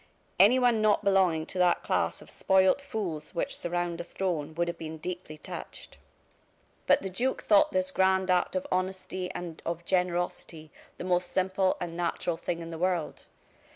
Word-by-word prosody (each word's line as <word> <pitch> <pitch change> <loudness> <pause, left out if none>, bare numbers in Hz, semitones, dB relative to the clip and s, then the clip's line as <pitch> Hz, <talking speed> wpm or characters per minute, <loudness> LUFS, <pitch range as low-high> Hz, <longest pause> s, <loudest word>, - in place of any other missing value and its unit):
Anyone 240 +2 +5
not 215 -1 +3
belonging 185 -5 +3
to 185 - -6
that 180 -1 +3
class - - -1
of - - -14
spoiled 190 +6 +3
fools 190 - -5
which - - -1
surround 175 0 -2
a - - -5
throne 165 -5 -3
would 170 +1 0
have 170 0 -4
been 160 0 -6
deeply 175 -1 -6
touched. - - -9 0.9
But - - +4
the 190 - -3
duke 250 +8 -1
thought 205 -2 +5
this 185 0 +1
grand 190 0 +2
act 180 +1 +1
of 185 - -1
honesty 185 0 -2
and 170 -2 -6
of 170 0 -4
generosity 175 -3 -1 0.3
the - - -6
most 180 0 0
simple 190 0 +1
and 170 -2 -5
natural 170 0 -1
thing 170 0 -3
in 165 0 -7
the 165 - -6
world. 180 -3 -1
180 Hz, 170 wpm, -28 LUFS, 170-190 Hz, 0.9 s, Anyone